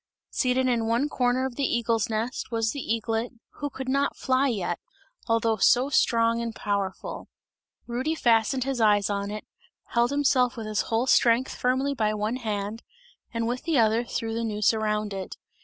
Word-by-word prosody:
Seated 255 0 +1
in 235 -3 +1
one 240 +6 +1
corner 255 -1 +1
of 260 -2 -5
the 280 - -1
eagle's 230 0 0
nest 225 +3 -3
was 225 -1 0
the 285 - -5
eaglet, 225 0 -2 0.3
who 290 - -2
could 265 -1 -7
not 275 +2 +1
fly 260 +1 +1
yet, 190 -8 -2 0.5
although 230 -1 +2
so 250 +6 +4
strong 230 -3 +2
and 230 -1 -4
powerful. 200 -2 -3 0.6
Rudy 255 +7 -2
fastened 240 0 +2
his 265 -2 -2
eyes 205 -2 +3
on 200 0 -2
it, 210 +1 -6 0.4
held 235 0 +2
himself 260 -3 +2
with 225 - -5
his 215 -1 0
whole 225 +2 +1
strength 245 0 +3
firmly 260 +3 0
by 215 -5 0
one 215 +4 -1
hand, 215 -1 -3 0.5
and 230 -1 -2
with 245 +1 -2
the 325 -3 0
other 225 0 +3
threw 225 -1 -3
the 230 +1 -2
noose 210 -1 +2
around 215 -1 -1
it. 190 -1 -6
230 Hz, 175 wpm, -26 LUFS, 220-255 Hz, 0.6 s, so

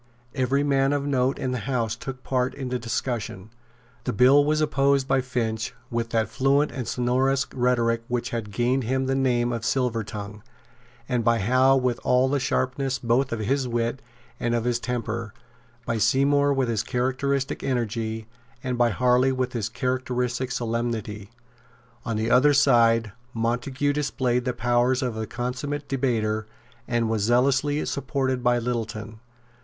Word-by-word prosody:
Every 135 +1 +1
man 135 -1 +2
of 140 -1 -1
note 135 -1 +1
in 130 - -2
the 125 - -2
House 115 -4 0
took 130 +2 -8
part 130 0 0
in 130 -2 -5
the 125 0 -2
discussion. 115 -3 -4 0.5
The - - 0
bill 130 +7 +6
was 155 +1 +1
opposed 140 -2 +2
by 135 -1 +2
Finch 120 -2 -2 0.2
with 115 -1 -1
that 115 -2 +1
fluent 135 +6 +2
and 125 -4 -5
sonorous 130 +2 +1
rhetoric 120 -2 +1
which 120 -1 -2
had 115 -3 -3
gained 120 +4 0
him 130 +3 0
the 135 - 0
name 120 -3 +1
of 115 - -3
Silvertongue, 110 -4 -2 0.7
and 125 -3 0
by 115 +1 +3
Howe 130 +6 +4
with 125 -2 0
all 125 +1 +3
the 145 +1 +1
sharpness 130 +1 -1
both 125 +3 +1
of 115 -2 -2
his 130 +5 0
wit 120 +2 -1 0.4
and 120 0 0
of 115 - 0
his 120 0 0
temper, 115 -2 -4 0.5
by 115 - -1
Seymour 140 +5 +3
with 125 -6 0
characteristic 130 +2 -1
energy, 115 -3 -2 0.4
and 125 -2 -2
by 120 -1 +4
Harley 125 +4 +3
with 125 -4 -2
characteristic 125 -1 -1
solemnity. 115 -4 -3 0.8
On 115 -3 -2
the 110 +2 -1
other 145 +3 +5
side 115 -5 +4 0.2
Montague 125 +5 0
displayed 130 -4 0
the 125 - 0
powers 120 +2 +1
of 125 -3 -2
a 110 -1 -4
consummate 140 +5 -4
debater, 110 -5 -1 0.4
and 120 -2 +1
was 110 -1 0
zealously 135 +6 +2
supported 130 -2 -1
by 120 0 +3
Littleton. 115 -2 -4
125 Hz, 155 wpm, -25 LUFS, 115-135 Hz, 0.8 s, bill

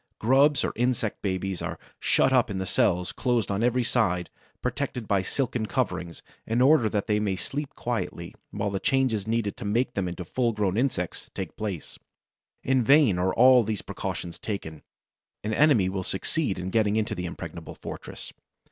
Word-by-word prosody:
Grubs 135 +5 +4
or - - -1
insect 120 -3 0
babies 95 -2 -2
are - - -4 0.2
shut 130 - +3
up 125 -3 +4
in 95 -2 -2
cells 90 -1 +1
closed 120 -4 0
on 100 +2 0
every 125 +1 +2
side, 100 -8 0 0.3
protected 125 -2 -3
by 100 -2 +2
silken 115 +2 -1
coverings, 85 -3 -2 0.2
in 115 +2 +1
order 130 -3 +5
that 105 -1 -1
they 105 -1 +1
may 100 -3 0
sleep 145 +9 -4
quietly 110 -8 -3 0.2
while 100 - -2
the 95 - -1
changes 130 -7 +1
needed 115 -2 0
to - - -7
make 115 +5 0
them 95 -2 -1
into 90 0 -5
full 120 +6 0
grown 100 -3 0
insects 115 -8 -1
take 95 -4 -5
place. 100 -7 -5 0.6
In 130 0 +3
vain 135 - +5
are 95 +1 +2
all 125 0 +7
these 105 -1 -3
precautions 85 -1 -5
taken. 80 -7 -5 0.6
An 110 +1 -1
enemy 135 -9 +4
will 95 0 -2
succeed 95 - -1
in 90 +1 -4
getting 105 -1 +2
into 110 -1 0
the 90 0 -3
impregnable - - -7
fortress. - - -8
110 Hz, 175 wpm, -27 LUFS, 95-125 Hz, 0.6 s, all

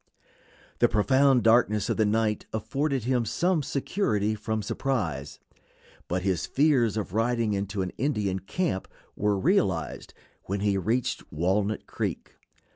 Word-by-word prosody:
The - - +4
profound 130 +3 +3
darkness 110 -3 +3
of - - -1
the 110 -2 +3
night 110 0 0
afforded 135 +5 -1
him 125 0 +1
some 175 - +1
security 130 - 0
from 110 0 -3
surprise, 95 - -2 0.7
but 90 +1 -1
his 95 -6 0
fears 130 -7 +2
of 100 -4 -3
riding 115 -1 +1
into 100 0 -2
an 90 - -4
Indian 105 -8 0
camp 105 - -2 0.3
were 105 -1 +1
realized 95 - 0 0.3
when 100 +1 -2
he 100 -1 +2
reached 110 +6 0
Walnut 95 +6 0
Creek. - - -4
110 Hz, 130 wpm, -27 LUFS, 100-130 Hz, 0.7 s, The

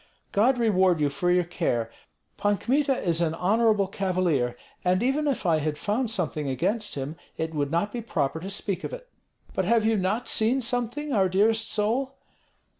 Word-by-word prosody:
"God 245 +6 +3
reward 190 -7 +3
you 145 -1 +1
for 175 +6 -1
your 180 0 +4
care. 120 -9 -2 0.4
Pan 205 0 +1
Kmita 275 +3 +1
is 170 -2 +1
an 165 -1 0
honorable 210 +2 +2
cavalier, 180 -11 0 0.3
and 185 +3 +2
even 285 +4 +1
if 275 -7 -1
I 165 -3 +3
had 150 0 -2
found 220 - -1
something 150 -9 -1
against 205 - -1
him 140 +3 -4 0.2
it 160 0 -3
would 145 -2 -1
not 170 +6 0
be 240 - -3
proper 160 -8 -1
to 185 +4 -6
speak 200 -2 -3
of - - -5
it." - - -8 0.5
"But 190 - 0
have 225 +2 +3
you 225 0 +3
not 205 +6 -1
seen 230 +5 +3
something, 245 +4 -2
our 190 -4 +3
dearest 215 +4 +2
soul?" 245 +6 0
200 Hz, 185 wpm, -26 LUFS, 165-230 Hz, 0.5 s, your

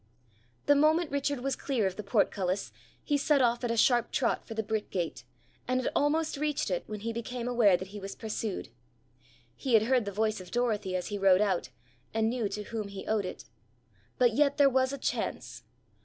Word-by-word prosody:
The 290 - +6
moment 310 +3 +3
Richard 280 -1 -1
was 275 +1 -1
clear 255 -7 -1
of 190 -1 -1
the - - -5
portcullis, 195 - 0 0.3
he 290 -1 +1
set 290 0 +3
off 240 -1 +2
at 240 - 0
a 230 - 0
sharp 240 0 +3
trot 245 - 0
for 225 - -6
the 220 - -1
brick 215 0 -2
gate, 165 -9 -3 0.4
and 255 +1 +1
had 255 - -1
almost 310 +1 +1
reached 295 -7 -1
it 180 - -1
when 210 -1 -6
he 230 +1 -3
became 235 +1 -4
aware 230 -7 +4
that 185 +1 -8
he 205 +1 -8
was 195 0 -7
pursued. 215 - -4 0.9
He 255 -4 +1
had 220 - +6
heard 245 -1 +2
the 200 - -3
voice 215 0 0
of 180 - -11
Dorothy 215 -6 -1
as 180 - -2
he 205 -1 -3
rode 190 -1 +5
out, 195 -4 0 0.5
and 225 0 +2
knew 235 -4 -1
to 210 +1 -4
whom 215 -1 -4
he 200 -1 -8
owed 215 -3 0
it. - - -7 0.7
But 245 -3 +4
yet 285 +3 +2
there 280 -1 +5
was 260 0 +2
a 280 - -4
chance. - - -3
225 Hz, 210 wpm, -30 LUFS, 200-260 Hz, 0.9 s, The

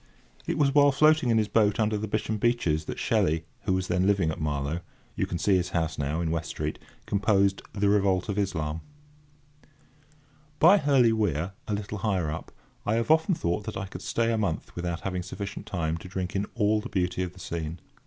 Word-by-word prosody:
It - - -1
was 140 -2 +3
while 145 -1 +6
floating 155 -1 +4
in 115 - +4
his 110 -1 +2
boat 105 0 +2
under 110 0 +2
the 105 +1 -2
Bisham 110 +1 -2
beeches 95 -10 +1
that - - -5
Shelley, 80 +1 +1 0.2
who 95 - +2
was 95 0 -1
then 90 +1 +1
living 95 -6 +2
at 80 - -6
Marlow 75 +1 -1 0.4
(you - - -1
can 85 - -3
see 95 +3 +3
his 90 0 -1
house 80 -2 -1
now, 75 +4 -1
in 80 -2 -1
West 85 -1 -2
street), - - -4 0.3
composed 100 -1 +2
The 100 0 +1
Revolt 100 -3 +2
of 105 -1 -1
Islam. 80 -5 -2 1.8
By 185 +7 +7
Hurley 135 -7 +4
Weir, 90 -5 0 0.2
a 105 - 0
little 105 0 -5
higher 95 -7 0
up, 80 - -6 0.3
I 110 - +1
have 115 +6 +1
often 160 +3 +4
thought 90 - -1
that - - -5
I 95 - -3
could 95 -1 -9
stay 115 +5 0
a 115 - 0
month 95 -7 -2
without 85 -1 -3
having 90 0 -2
sufficient 100 +2 -6
time 80 -3 -1
to 90 - -10
drink 95 0 -4
in 100 +1 0
all 105 -1 +2
the 125 - -7
beauty 90 -1 -1
of 90 -1 -3
the 95 - -15
scene. 80 -1 -5
95 Hz, 210 wpm, -27 LUFS, 85-110 Hz, 1.8 s, By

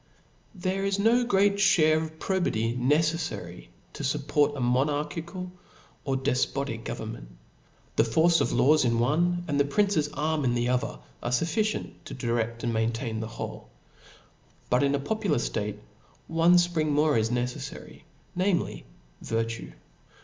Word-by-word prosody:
Tp 180 - -12
HERE 190 +1 0
is 195 0 0
no 230 +4 +4
great 200 -3 +3
ihare 160 -6 +4
of 160 0 -7
probity 120 - 0
necef 155 +6 +2
fary 85 - -9 0.2
to - - -7
fupport 145 +1 +1
a - - -4
monarchical 150 +8 -1 0.5
or 135 -2 0
defpotic 130 -2 -1
government. - - -6 0.7
The - - +6
force 160 +9 +3
of - - +1
laws 150 +2 +4
in 115 -2 +2
one, 175 +8 +1
and 145 -2 0
the - - +6
prince's 155 +1 +1
arm 155 0 0
in 120 -2 +1
the 120 0 0
other, 125 +2 -1 0.2
are - - -2
fulficicnt 170 - 0
to - - -7
dirediand 115 -1 -1
itiaintain 115 0 -1
the 110 - -4
whole. 115 +1 -7 1.0
But 125 - +4
in 140 0 +2
a - - -1
popular 195 - 0
ftate, 105 -3 -2 0.5
one 165 +2 +4
ipring 175 -3 +2
more 150 0 +3
is 110 0 +2
necelTary, 125 +1 -4 0.3
namely, 185 0 0 0.4
virtue. 115 - -3
145 Hz, 145 wpm, -27 LUFS, 120-170 Hz, 1.0 s, The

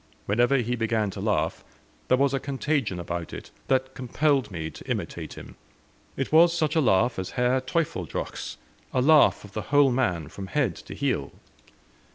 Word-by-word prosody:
Whenever 120 +6 +3
he 120 -1 0
began 115 -3 0
to - - -7
laugh, - - 0 0.4
there 130 - +4
was 140 0 +2
a 135 - +1
contagion 135 - -1
about 85 -1 -4
it, - - -9 0.2
that 130 0 +1
compelled 135 0 +1
me 80 -5 -4
to - - -12
imitate - - -4
him. - - -11 0.6
It 135 - -2
was 170 +2 +6
such 155 -1 0
a 160 - +4
laugh 115 -2 +2
as 95 - -4
Herr 125 +1 +2
Teufelsdrockh's 130 - -3 0.4
a 130 - +3
laugh 155 +1 +5
of 100 - -12
the 110 - -3
whole 145 -2 +5
man 90 - 0
from 95 +4 -8
head 125 - 0
to - - -10
heel. - - -1
125 Hz, 175 wpm, -26 LUFS, 100-140 Hz, 0.6 s, was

